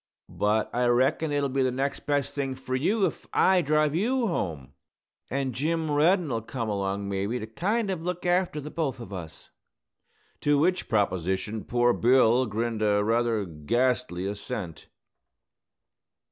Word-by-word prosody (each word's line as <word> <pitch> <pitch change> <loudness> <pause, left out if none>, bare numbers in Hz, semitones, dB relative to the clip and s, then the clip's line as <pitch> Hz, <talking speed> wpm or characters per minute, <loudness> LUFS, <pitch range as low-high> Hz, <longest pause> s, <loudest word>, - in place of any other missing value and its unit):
But 105 +1 0
I 125 0 +1
reckon 130 +6 +2
it'll 145 -1 +1
be 135 0 -1
the 130 - +3
next 135 +2 -3
best 145 -1 0
thing 135 -2 -2
fur 130 0 -6
you 195 +11 +2
if - - -4
I 185 -1 +4
drive 150 -1 +2
you 235 +8 +1
home. 80 - -3 0.6
An' 135 -1 -2
Jim 160 +4 -1
Reddin'll 150 - +2
come 115 0 -4
along, 100 0 -2
maybe, 100 +4 -1
to 110 - -5
kind 195 - -1
of 180 -4 -3
look 180 +1 -4
after 175 -3 +1
the 150 +1 -7
both 150 -6 -2
of 115 -4 -9
us." 80 -5 -9 0.9
To 145 0 +2
which 180 +5 +1
proposition 100 0 0
poor 120 0 +2
Bill 125 0 +4
grinned 110 +1 -2
a 105 -1 +3
rather 115 -1 +1
ghastly 95 - -1
assent. 100 -4 -5
125 Hz, 150 wpm, -27 LUFS, 105-150 Hz, 0.9 s, I